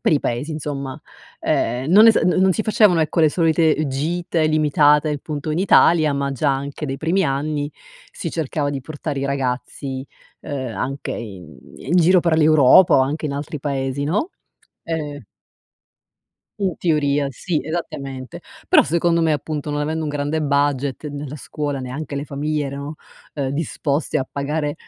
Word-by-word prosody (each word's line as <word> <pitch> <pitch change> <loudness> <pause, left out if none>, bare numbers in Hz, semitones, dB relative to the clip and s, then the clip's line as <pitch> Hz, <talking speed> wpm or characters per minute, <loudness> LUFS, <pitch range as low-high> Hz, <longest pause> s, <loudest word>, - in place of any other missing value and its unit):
per - - +2
i 145 - +3
paesi 120 +7 -2
insomma. 140 -3 -5 0.4
Ehm, 125 +5 0
non 210 +5 +8
esa 225 - +6
non 180 - +2
non 190 0 +4
si 215 - -1
facevano 210 -5 +4
ecco, 160 +1 +1
le 155 - +6
solite, 160 -2 +2
ehm, 155 - -1
gite 160 +3 -1
limitate 150 0 +3
appunto 150 +1 -4
in 155 - -1
Italia 165 -5 +4
ma 140 0 -1
già 140 +1 +1
anche 140 +2 -5
dai 135 0 -3
primi 175 +6 +1
anni 145 +1 -1 0.4
si 165 - -5
cercava 150 -2 -2
di 140 -1 -4
portare 145 +1 -5
i 140 - -2
ragazzi, 130 0 -3 0.3
uhm, 130 -5 -5
anche 135 +2 -4
in 90 - -8 0.2
in 160 - -1
giro 180 +1 +5
per 165 -2 +2
l'Europa 155 +2 +6
o 135 - +5
anche 150 +4 -1
in 145 - -3
altri 145 +1 -5
paesi 135 -1 -2
no. 205 - -1 0.5
Ehm 150 -5 -4 1.4
In 190 -4 0
teoria 145 -4 +1
sì, 155 +5 -2
esattamente, 140 -5 -5 0.3
però - - +7
secondo 170 0 +1
me 160 - +3
appunto 150 0 -3
non 145 0 -2
avendo 160 +2 -2
un 150 - -2
grande 145 +2 -2
budget, 140 0 0
né 145 +1 -6
la 145 +2 -7
scuola 145 0 -4
neanche 135 +3 -6
le 140 - -3
famiglie 145 +1 -2
erano, 140 +2 -6 0.4
uhm, 140 -3 -2
disposte 145 0 -1
a 130 - -4
pagare, 145 +1 -2
145 Hz, 170 wpm, -21 LUFS, 140-160 Hz, 1.4 s, non